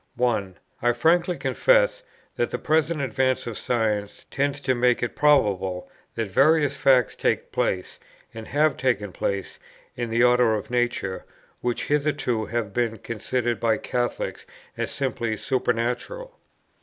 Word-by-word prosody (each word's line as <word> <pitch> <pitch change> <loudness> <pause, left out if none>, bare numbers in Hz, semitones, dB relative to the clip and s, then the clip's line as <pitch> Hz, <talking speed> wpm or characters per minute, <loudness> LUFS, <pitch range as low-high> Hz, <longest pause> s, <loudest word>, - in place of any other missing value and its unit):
1. 110 -7 0 0.2
I 120 0 +3
frankly 170 +8 +2
confess - - +2 0.3
that - - 0
the - - -3
present 155 0 +1
advance 130 0 0
of 115 - -5
science 110 -4 -1
tends 140 +1 0
to 130 - +1
make 125 0 +2
it 120 - -2
probable 100 -11 +2 0.3
that 115 -2 -2
various 145 - +3
facts 130 -4 +3
take - - -1
place, 90 -1 -2 0.3
and 115 -1 -8
have 150 +2 +2
taken 110 -7 0
place, 100 +1 -3 0.4
in 120 -1 -3
the 115 +1 +2
order 125 -2 +4
of 105 +2 -6
nature, 120 -6 -1 0.4
which 120 -1 -2
hitherto 145 -6 0
have 115 -4 -3
been 115 -2 0
considered 120 +2 -2
by 115 -2 +2
Catholics 120 +2 -3 0.3
as - - -3
simply 115 -5 -2
supernatural. 130 - -2
120 Hz, 140 wpm, -24 LUFS, 110-140 Hz, 0.4 s, order